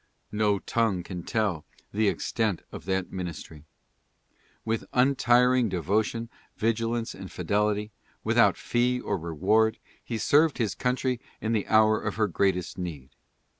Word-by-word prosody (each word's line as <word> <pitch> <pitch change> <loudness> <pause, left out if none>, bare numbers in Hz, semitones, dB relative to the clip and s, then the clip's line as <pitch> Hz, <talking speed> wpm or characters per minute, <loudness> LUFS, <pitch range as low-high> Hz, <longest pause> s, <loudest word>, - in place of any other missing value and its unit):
No 105 -1 +2
tongue 100 -2 0
can 90 -1 -6
tell 100 -5 -1 0.3
the 110 +1 +2
extent 105 -1 -1
of - - -9
that 95 -1 -1
ministry. 85 -4 -7 1.0
With 115 0 -1
untiring 125 -2 +4
devotion, 105 +6 -1 0.3
vigil 115 +1 0
ance 115 -1 -3
and - - -9
fidelity, 105 +1 0 0.3
without - - +4
fee 125 +1 +1
or 105 - -2
reward, 100 +7 +1 0.3
he 115 - -4
served 150 +7 +3
his 110 -4 0
country 125 -1 -1 0.2
in 110 - -2
the 105 -3 0
hour 110 0 +4
of 105 - -3
her 110 -1 +2
greatest 90 -1 0
need. 75 -7 -6
110 Hz, 135 wpm, -27 LUFS, 95-115 Hz, 1.0 s, untiring